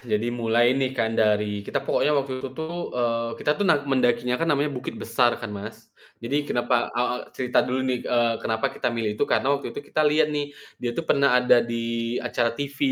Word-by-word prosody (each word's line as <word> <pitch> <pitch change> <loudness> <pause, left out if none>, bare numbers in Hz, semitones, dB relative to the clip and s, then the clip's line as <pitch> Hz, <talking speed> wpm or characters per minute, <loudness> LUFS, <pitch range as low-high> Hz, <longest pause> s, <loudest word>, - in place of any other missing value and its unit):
jadi 115 -1 -1
mulai 120 +1 +3
nih 130 0 -1
kan, 115 -2 0
dari 105 -2 +1
kita 100 - -3
pokoknya 150 0 +2
waktu 135 -2 -2
itu 135 - -4
tuh, 165 +2 -4
eee, 115 -1 -1
kita 150 - +1
tuh 205 - -2
nak 145 - +3
mendakinya 125 -2 +1
kan 165 - 0
namanya 145 -1 +1
Bukit 125 0 -6
Besar 120 -2 +1
kan, 115 -3 -7
Mas. 105 +3 -9 0.3
Jadi 145 +4 -1
kenapa 120 0 +1
aw 125 0 -1
ak - - -24
cerita 125 -1 +2
dulu 130 +1 -1
nih, 130 -2 0
eee, 120 -1 +1
kenapa 110 0 -1
kita - - -1
milih 115 -3 -2
itu, - - +5
karena 135 - +2
waktu 140 0 -2
itu - - -6
kita 155 - -1
liat 150 0 +2
nih 145 -1 0 0.4
dia 120 - -1
tuh 165 - -2
pernah 140 -4 +3
ada 125 -1 +5
di 115 0 -2
acara 120 -1 0
TV 140 0 -5
125 Hz, 215 wpm, -24 LUFS, 115-140 Hz, 0.4 s, itu